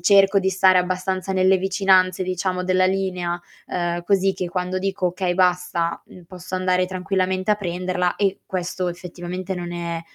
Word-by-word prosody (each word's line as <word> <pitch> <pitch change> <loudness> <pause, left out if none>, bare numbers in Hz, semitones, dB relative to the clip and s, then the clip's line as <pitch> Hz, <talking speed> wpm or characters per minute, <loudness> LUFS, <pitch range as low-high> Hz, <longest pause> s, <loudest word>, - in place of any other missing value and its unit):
cerco 195 +2 +5
di 190 -1 0
stare 190 0 +4
abbastanza 185 +1 -1
nelle 190 0 +4
vicinanze, 190 -1 +3
diciamo, 185 0 -2
della 185 0 +3
linea, 185 -2 -1 0.3
uhm, 175 0 -2
così 195 0 +2
che 180 -1 -4
quando 180 +1 -2
dico: 190 -1 -1
"Okay, 180 0 -2
basta", 180 -2 +1
mhmm, 180 - -14
posso 185 +1 -8
andare 185 0 +1
tranquillamente 185 +1 -1
a - - +5
prenderla 180 -1 -1
e 195 -1 0
questo 180 0 -2
effettivamente 180 +1 -5
non 175 -1 -5
è 170 -1 -3
185 Hz, 160 wpm, -22 LUFS, 180-190 Hz, 0.3 s, cerco